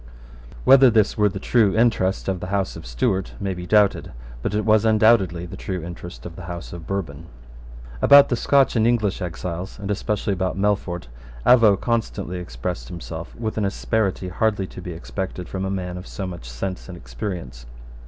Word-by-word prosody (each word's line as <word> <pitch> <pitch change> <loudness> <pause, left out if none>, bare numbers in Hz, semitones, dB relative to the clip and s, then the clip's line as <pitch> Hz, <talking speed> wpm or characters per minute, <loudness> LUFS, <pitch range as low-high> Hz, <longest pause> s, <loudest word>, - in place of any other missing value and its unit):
Whether 135 -1 +7
this 110 -3 +2
were 105 -1 +3
the 95 - -6
true 105 -2 +2
interest 100 -5 +2
of 95 -2 -1
the 90 - -6
House 100 0 -1
of - - -9
Stuart 90 +10 -1
may 100 -1 -2
be 90 0 -7
doubted. 105 -7 +2 0.3
But 100 - -2
it 105 - 0
was 110 -1 +4
undoubtedly 110 -6 +3
the 90 - -8
true 90 -4 -4
interest 85 +1 -9
of 85 - -8
the 90 - -9
House 85 -1 -7
of 85 -2 -9
Bourbon, 85 -5 -4 0.7
About 140 0 +8
the 120 - +1
Scotch 135 +3 +3
and 110 0 +3
English 110 -5 +1
exiles, 90 +1 -5
and 100 0 -4
especially 105 0 -1
about 95 0 -2
Melfort, 95 -4 -1 0.4
Avaux 110 -6 +6
constantly 105 -6 -2
expressed - - -5
himself 85 +1 -8
with 110 -2 -3
an 105 - +1
asperity 100 -2 -1
hardly 100 +1 0
to - - -14
have 90 - -8
been 90 -2 -5
expected 90 0 -5
from 95 0 -4
a - - -2
man 90 -2 -4
of 90 - -11
so 100 - -5
much 85 -9 -7
sense 90 +12 -5
and 90 - -8
experience. 60 -2 -6
95 Hz, 190 wpm, -23 LUFS, 90-105 Hz, 0.7 s, About